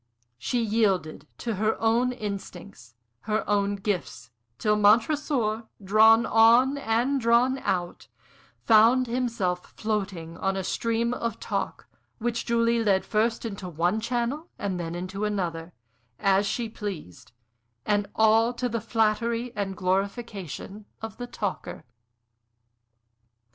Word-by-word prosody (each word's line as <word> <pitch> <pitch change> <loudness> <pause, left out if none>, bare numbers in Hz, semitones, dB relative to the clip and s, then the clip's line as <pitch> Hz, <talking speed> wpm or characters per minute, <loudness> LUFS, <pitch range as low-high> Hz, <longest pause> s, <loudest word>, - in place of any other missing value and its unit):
She 245 - -1
yielded 205 -7 0
to 230 - -3
her 215 +2 0
own 235 +3 +2
instincts, 200 - -8 0.3
her 215 +1 0
own 205 -1 +1
gifts, 165 - -4 0.3
till 210 - +2
Montresor, 225 +1 +2 0.2
drawn 220 +3 +6
on 235 +5 +5
and 255 +3 0
drawn 240 +3 +3
out, 175 -6 -3 0.6
found 230 +3 +5
himself 230 -7 -2
floating 195 -6 -3
on 195 0 -1
a 190 - -2
stream 230 +4 -1
of 230 -2 -3
talk, - - -4 0.3
which 235 0 -3
Julie 235 0 +2
led 195 -3 +2
first 225 +2 0
into 195 -4 -5
one 175 +6 0
channel 245 +8 -2
and 190 -3 -3
then 170 0 -4
into 185 +3 -5
another, 175 -5 -2 0.5
as 195 +1 +2
she 230 +3 -2
pleased; 200 - -7 0.5
and 205 -1 0
all 225 +2 +4
to 250 +1 -2
the 230 -1 -3
flattery 230 +2 0
and 195 -2 -3
glorification 195 - -3 0.2
of 225 - -6
the 245 - -6
talker. 205 -5 -5
215 Hz, 120 wpm, -26 LUFS, 195-235 Hz, 0.6 s, drawn